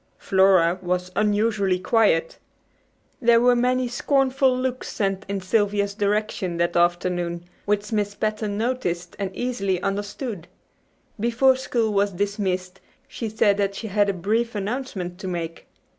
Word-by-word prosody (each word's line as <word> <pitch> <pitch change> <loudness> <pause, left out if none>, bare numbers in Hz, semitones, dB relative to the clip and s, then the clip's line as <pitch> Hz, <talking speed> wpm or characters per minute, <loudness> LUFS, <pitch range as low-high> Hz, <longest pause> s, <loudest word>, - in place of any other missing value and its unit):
Flora 190 -2 +3
was 180 0 -2
unusually 210 -2 +2
quiet. 185 -4 +2 0.8
There 235 -1 +5
were 245 +1 +4
many 250 +1 +1
scornful 265 +1 +2
looks 255 0 -3
sent 195 -1 -2
in 200 -1 -2
Sylvia's 200 +1 +1
direction 205 -3 -1
that 170 0 0
afternoon, 175 0 0 0.2
which 205 +1 -1
Miss 205 -2 -1
Patten 215 -1 -2
noticed 195 -8 -2
and 195 -1 -1
easily 200 -7 -1
understood. 205 -1 -4 0.7
Before 240 +4 +3
school 235 -4 -1
was 200 0 +1
dismissed 190 -1 -2 0.3
she 230 -4 -5
said 210 -1 +2
that 200 -1 0
she 220 +2 -5
had 205 0 +2
a - - +1
brief 220 +6 -1
announcement 200 -4 -4
to 190 - -6
make. 170 -2 -5
205 Hz, 135 wpm, -23 LUFS, 185-230 Hz, 0.8 s, There